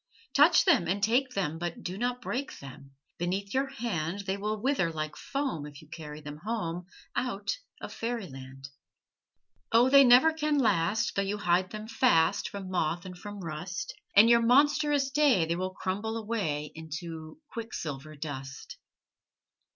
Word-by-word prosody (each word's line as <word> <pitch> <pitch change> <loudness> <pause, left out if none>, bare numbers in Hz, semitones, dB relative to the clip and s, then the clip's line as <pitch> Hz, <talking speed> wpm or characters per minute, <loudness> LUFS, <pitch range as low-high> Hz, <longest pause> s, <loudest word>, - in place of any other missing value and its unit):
Touch - - +6
them 330 - +4
and 195 +3 -1
take 250 +4 +2
them, 165 -5 -1
But 175 -1 -4
do 180 - -4
not 245 +3 -2
break 270 +3 -3
them! 135 0 -12 0.3
Beneath 190 +3 -2
your 270 +1 +1
hand 205 - -3
They 195 -1 -2
will 210 +2 -3
wither 250 -8 +1
like 155 -1 -4
foam 270 - -3
If 145 -1 -11
you 155 - -16
carry 155 -1 -8
them 145 0 -8
home 180 -3 -4 0.3
Out 245 - -2 0.2
of - - -7
fairy 230 -2 -3
land. 135 -1 -10 1.0
O, 240 +3 +5
they 280 0 +9
never 255 +6 +7
can 305 -2 0
last 215 -2 +2
Though 200 - +2
you 200 +1 -2
hide 185 -2 +2
them 215 +1 -7
fast 225 -8 +3
From 195 -2 -7
moth 175 0 -1
and 185 -1 -7
from 205 +2 -8
rust; 180 - -5 0.2
In 205 +3 +8
your 235 0 +6
monstrous 285 +3 +3
day 275 - +4
They 165 +1 -1
will 185 +2 -2
crumble 205 +5 -2
away 195 -10 -2
Into 160 - -7
quicksilver 155 - -5
dust. 140 -3 -7
195 Hz, 160 wpm, -29 LUFS, 160-240 Hz, 1.0 s, they